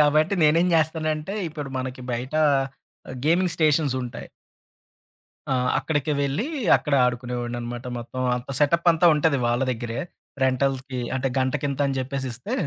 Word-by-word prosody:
కాబట్టి 155 +5 +3
నేనేం 165 +4 +4
జేస్తానంటే, 155 +2 0
ఇప్పుడు 150 -2 -6
మనకి 130 0 -5
బయట 125 +5 -4 0.9
గేమింగ్ 175 +2 +3
స్టేషన్సుంటాయి. 140 -6 0 1.2
ఆ! - - +2 0.2
అక్కడికి 150 -1 -1
వెళ్లి 140 - -1 0.3
అక్కడ 150 - -1
ఆడుకునేవాడిననమాట. 120 0 -3
మొత్తం 125 +2 -6 0.2
అంతా. 125 +2 -6
సెటపంతా 170 +3 +4
ఉంటది 150 -1 +2
వాళ్ళ 120 +1 +1
దగ్గరే. 120 +1 -5 0.5
రెంటల్‌కి 130 0 0 0.2
అంటే 135 +1 0
గంటకింత 140 +1 -1
అని 135 -1 -2
జెప్పేసిస్తే 130 - -4
140 Hz, 115 wpm, -24 LUFS, 125-155 Hz, 1.2 s, నేనేం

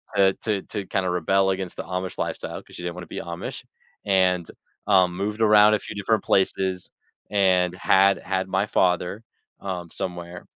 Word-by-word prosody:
to 95 -1 +4
to 105 -3 0
to 100 -3 -5
kinda 95 -1 -1
rebel 95 +3 +2
against 95 -1 -4
the - - -4
Amish 90 0 -4
lifestyle, - - -4
'cause - - -16
she - - -8
didn't 85 0 -4
wanna 90 -1 -8
be - - -6
Amish 85 0 -6 0.4
and, 90 -3 +2 0.4
uh, 95 -1 +5
moved 100 +5 -4
around 105 -1 +6
a 105 - +2
few - - -9
different 105 +1 0
places 95 -1 0 0.4
and 90 -3 +3
had 95 +2 +4
had 95 -1 -2
my 95 +1 0
father, 90 +4 +1 0.4
um, 90 -3 -5
somewhere, 85 -1 -6
95 Hz, 170 wpm, -24 LUFS, 90-100 Hz, 0.4 s, around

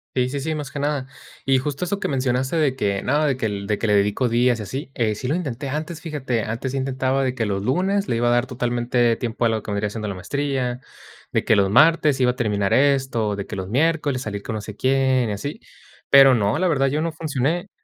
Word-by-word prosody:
Sí, 125 -1 +2
sí, 140 +2 -4
sí, 155 +3 -2
más 145 -2 -5
que 145 - -5
nada, 145 -2 -1 0.4
y 135 0 +4
justo 140 +5 -2
eso 200 +3 -3
que - - -1
mencionaste 130 +2 0
de 145 -5 +2
que, 100 -5 -1
no, 150 +3 +1
de 135 -3 +1
que 115 - -2
el 100 -2 -3
de 105 0 0
que 115 - -2
le 105 - +3
dedico 105 +5 +2
días 120 0 +2
y - - -4
así, 135 +7 -6 0.2
sí 125 - -5
lo 150 - +1
intenté 140 -6 -4
antes, 155 +3 -4
fíjate, 135 -8 -2
antes 120 +4 -4
intentaba 135 0 0
de 130 -1 0
que 115 -3 -2
los 100 -1 -2
lunes 190 - 0
le 115 - +1
iba 120 +1 +1
a - - +3
dar 120 +1 +2
totalmente 120 -1 0
tiempo 120 0 -2
a - - +4
lo 110 -2 -1
que 105 - -6
vendría 100 +1 -1
siendo 105 -1 -5
la - - -3
maestría, 130 +4 -2 0.5
de - - 0
que 110 - +4
los 100 -1 +3
martes 155 +2 +4
iba 125 -1 +3
a - - -10
terminar 105 -5 0
esto, 130 -7 +2
de 100 - -4
que - - -6
los 95 0 -5
miércoles 145 -1 +1
salir 100 -3 -5
con 110 - -4
no 110 - -4
sé 105 0 -8
quién 130 -2 +2
y - - -2
así, 125 +9 -5 0.5
pero 135 -1 +8
no, 105 - +1
la 185 - +2
verdad 135 -5 +2
yo 150 +3 0
no 165 -1 -2
funcioné. 160 +5 -2
130 Hz, 250 wpm, -22 LUFS, 110-140 Hz, 0.5 s, pero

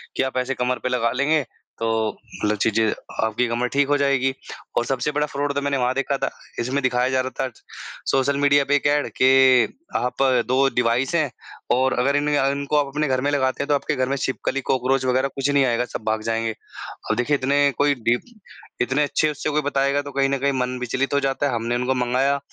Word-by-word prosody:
कि - - +1
आप 130 -1 -3
ऐसे 130 +1 0
कमर 125 0 -1
पे 125 - 0
लगा 115 -2 +1
लेंगे 145 +2 +2 0.4
तो 115 - -1 0.6
मतलब 105 0 +1
चीज़ें 110 +1 +2 0.4
आपकी 110 +3 0
कमर 120 +1 -1
ठीक 140 0 +3
हो 145 0 +2
जाएगी। 135 -2 +1 0.4
और 120 - +2
सबसे 135 +3 -1
बड़ा 150 +1 0
फ़्रॉड 145 0 -2
तो 140 - 0
मैंने 140 -1 0
वहाँ 125 0 +1
देखा 135 0 0
था, 135 - -1 0.3
इसमें 130 +4 -1
दिखाया 125 0 +1
जा 130 0 +1
रहा 130 - -3 0.2
था - - -11 0.6
सोशल 140 +1 +1
मीडिया 145 0 +4
पे 145 - +2
एक 145 - -1
ऐड 145 0 +1
कि 130 -1 +5 0.2
आप 125 +2 -1 0.2
2 130 +2 +3
डिवाइस 125 +3 +1
हैं 155 -4 +2 0.5
और 130 +1 +2
अगर 140 +3 +2
इन 145 +1 0
इनको 140 0 +1
आप 145 -1 +2
अपने 150 +2 -1
घर 130 -1 0
में 145 - 0
लगाते 130 -1 0
हैं - - -6
तो 145 - +4
आपके 150 +1 -1
घर 130 0 0
में 140 - 0
छिपकली 135 +1 -2
कॉकरोच 130 +1 +1
वग़ैरह 130 +1 +2
कुछ 135 +1 -1
नहीं 140 -1 +3
आएगा 120 0 +1
सब - - -3
भाग 110 0 0
जाएँगे। 115 0 -1 0.6
अब 110 - +2
देखिए 135 +5 +1
इतने 140 +2 +2
कोई 145 0 +3
डि 120 +1 +4 0.6
इतने 130 +4 +1
अच्छे 155 +1 +1
उससे 150 +1 -3
कोई 150 0 0
बताएगा 140 0 +1
तो 145 0 -9
कहीं 135 0 +1
न 140 - 0
कहीं 140 +1 +1
मन 125 0 -2
विचलित 130 +3 -1
हो 140 - +3
जाता 135 +1 -1
है। 130 - -2
हमने 115 +1 -1
उनको 125 +2 0
मँगाया 130 +3 +1
135 Hz, 225 wpm, -22 LUFS, 125-140 Hz, 0.6 s, कि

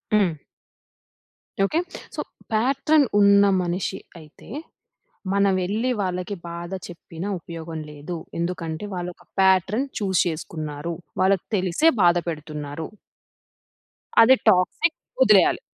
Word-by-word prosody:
హ్మ్. 185 -7 +2 1.3
Okay. 310 +11 0 0.4
So, - - -2 0.3
pattern 275 +6 +3
ఉన్న 200 0 +6 0.2
మనిషి 180 +2 -2 0.2
అయితే 155 +4 -16 0.8
మనమెల్లి 200 +4 +1
వాళ్ళకి 185 +1 -2
బాధ 170 +1 -6 0.2
చెప్పిన 170 0 -8
ఉపయోగం 165 -1 -7
లేదు. 150 +4 -7 0.2
ఎందుకంటే 170 +1 -3
వాళ్ళు 180 -1 -3
ఒక - - -21 0.2
ప్యాట్రన్ 190 +6 +3
చూజ్ 190 -3 +1
చేసుకున్నారు. 155 -1 -4 0.3
వాళ్ళకి 190 -1 +2
తెలిసే 185 - +2
బాధ 175 -1 +5
పెడుతున్నారు. 150 -1 -5 1.3
అది 255 +4 +8
టాక్సిక్. 185 - +2 0.3
వదిలేయాలి. - - +5
180 Hz, 100 wpm, -23 LUFS, 165-200 Hz, 1.3 s, అది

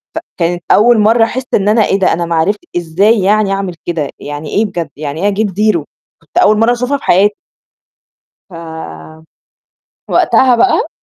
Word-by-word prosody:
فكانت 175 0 -3
أول 230 +1 +4
مرّه 225 +2 +4
أحس 250 +3 -2
إن 200 0 +1
أنا 215 -1 +3
إيه 195 - 0
ده 190 - +2
أنا 170 +1 -2
ما 170 0 -2
عرفت 200 +6 0 0.2
إزاي 195 +7 +1
يعني 205 0 +2
أعمل 195 -2 -3
كده، 160 -5 -3
يعني 145 +1 -7
إيه 220 +2 +1
بجد، 170 -6 -5
يعني 150 +2 -6
إيه - - +3
أجيب 205 +1 0
0؟ 200 -5 0 0.4
كانت 160 - -11
أول 210 +1 +4
مرّه 230 +2 +3
أشوفها 250 +4 -1
في - - -18
حياتي. 205 +3 +3 1.2
ف 175 - -13 1.6
وقتها 255 -2 +3
بقى 380 - +1
200 Hz, 170 wpm, -13 LUFS, 170-220 Hz, 1.6 s, أول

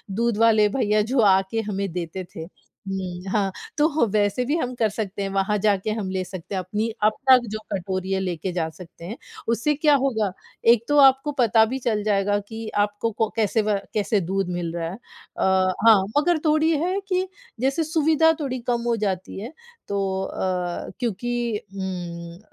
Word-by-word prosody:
दूध 235 0 +1
वाले 220 -2 +5
भैया 215 -3 +1
जो 245 +5 0
आके 195 +1 +3
हमें 200 -3 -3
देते 180 +1 -4
थे, - - -7
हुँ, 190 +1 -7
हाँ 195 -2 +1 0.3
तो 305 -3 +3
वैसे 205 +3 +1
भी 290 +5 0
हम 250 -6 -2
कर 225 -3 +1
सकते 205 -1 -4
हैं, 195 - -2
वहाँ 195 +2 +1
जाके 205 0 +1
हम 195 -3 -3
ले 185 0 -1
सकते 185 +1 -7
हैं, - - 0
अपनी 210 +5 -2
अपना 260 +5 +5
जो 215 0 -5
कटोरी 185 0 -3
है, 190 - +1
लेके 180 -1 -3
जा 170 -2 -1
सकते 170 +1 -12
हैं। 215 +7 -6 0.3
उससे 235 +6 +1
क्या 295 0 +4
होगा 220 -7 0 0.4
एक 230 -2 -1
तो 290 - +2
आपको 270 +1 +5
पता 225 -1 +5
भी 260 +4 -3
चल 220 -4 -1
जाएगा 205 -1 +2
कि 225 0 -7 0.2
आपको 205 +2 -3
को 220 0 0
कैसे 220 0 +2
व 210 -1 +1 0.2
कैसे 210 -1 +1
दूध 190 +1 -1
मिल 175 -2 -3
रहा 165 -1 -2
है। 180 - -6
अ, 190 -4 -1
हाँ 215 -4 +8 0.2
मगर 340 +3 +3
थोड़ी 310 +1 +3
है 370 +2 0
कि 370 0 +1 0.3
जैसे 270 +6 +1
सुविधा 320 0 +3
थोड़ी 260 -4 -3
कम 240 -1 +1
हो 235 - +2
जाती 190 -1 -3
है, 230 +8 -7 0.3
तो 195 -1 -1
अ, 180 -2 -3
क्योंकि 240 0 -1 0.2
उम, 175 -3 -5
210 Hz, 185 wpm, -23 LUFS, 190-240 Hz, 0.4 s, हाँ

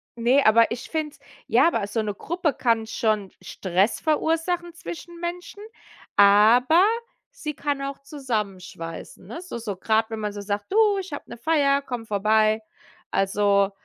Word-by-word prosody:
Ne, 245 +4 +3
aber 225 +1 +5
ich 235 +1 -6
find's 310 -2 -3 0.3
ja, - - +4
aber 200 - -2
so 225 +2 -2
'ne 205 -1 -3
Gruppe 330 - -2
kann 230 -2 +1
schon 215 -3 -1
Stress 185 +3 0
verursachen 330 +3 0
zwischen 340 +1 -9
Menschen, 350 +3 -6 0.6
aber 225 - +6 0.5
sie 305 - -6
kann 285 -1 -2
auch 275 0 -4
zusammenschweißen, 200 - -5
ne? 320 - -8
So 360 -9 -7
so 215 -4 -5
grad 220 +3 0
wenn 220 - -4
man 210 -1 -3
so 205 0 -7
sagt: 205 - -4
„Du, 420 -2 +4
ich 370 -5 -7
habe - - -5
'ne - - -7
Feier, 280 0 +2
komm 245 -4 -6
vorbei.“ 215 +1 +2 0.5
Also 200 0 +2
235 Hz, 155 wpm, -24 LUFS, 205-315 Hz, 0.6 s, aber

